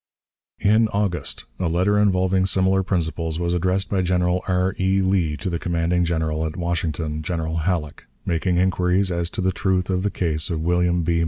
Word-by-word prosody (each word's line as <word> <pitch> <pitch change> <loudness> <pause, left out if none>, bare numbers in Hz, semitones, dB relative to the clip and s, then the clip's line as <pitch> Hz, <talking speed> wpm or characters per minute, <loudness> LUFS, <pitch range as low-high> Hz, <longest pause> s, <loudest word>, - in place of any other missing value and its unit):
In 110 +2 +4
August 100 -4 -2
a 90 -3 0
letter 95 +5 +2
involving 95 -2 +2
similar 95 0 +2
principles 80 -3 -2
was 85 0 0
addressed 90 +2 0
by 95 -2 +2
General 90 0 +1
R. 90 0 +1
E. 95 +1 +2
Lee 90 -5 +1
to 70 - -5
the 85 -2 -1
commanding 85 0 0
General 80 -2 -1
at 80 - -7
Washington, 80 -3 -2
General 80 0 -3
Halleck, 80 -3 -2 0.2
making 85 +1 0
inquiries 90 +1 +2
as 85 -1 -1
to - - -4
the 95 0 +2
truth 95 0 0
of 90 0 0
the 105 - 0
case 80 -5 -2
of 85 -3 -2
William 90 +1 +1
B. 85 0 +1
90 Hz, 180 wpm, -22 LUFS, 85-95 Hz, 0.2 s, In